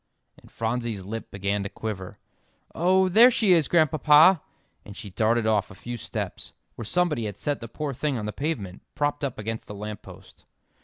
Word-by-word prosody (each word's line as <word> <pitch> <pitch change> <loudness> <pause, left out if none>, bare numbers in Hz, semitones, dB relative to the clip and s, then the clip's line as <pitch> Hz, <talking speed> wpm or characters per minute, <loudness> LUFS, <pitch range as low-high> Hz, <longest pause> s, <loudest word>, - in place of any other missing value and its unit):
And - - -19
Phronsie's 115 -3 -3
lip 110 +3 -6
began 100 +1 -2
to 100 - -4
quiver. 95 -5 -6 0.6
"Oh, 185 +3 +3
there 225 +7 +7
she 225 -5 +2
is, 165 -5 +5
Grandpapa!" 155 +1 +5 0.4
and 105 0 -11
she 100 - -8
darted 110 +4 +1
off 105 -2 +1
a - - -12
few 120 0 -6
steps, 115 - -6 0.2
where - - -7
somebody 160 -4 0
had 100 -2 -5
set 145 -1 -2
the 115 - -7
poor 140 +5 -4
thing 140 +1 -2
on 105 - -4
the 105 - -4
pavement, 125 - -4
propped 145 0 -1
up 135 -3 -2
against 110 +1 -5
a 105 - -6
lamp 105 0 -6
post. - - -15
115 Hz, 190 wpm, -25 LUFS, 105-155 Hz, 0.6 s, there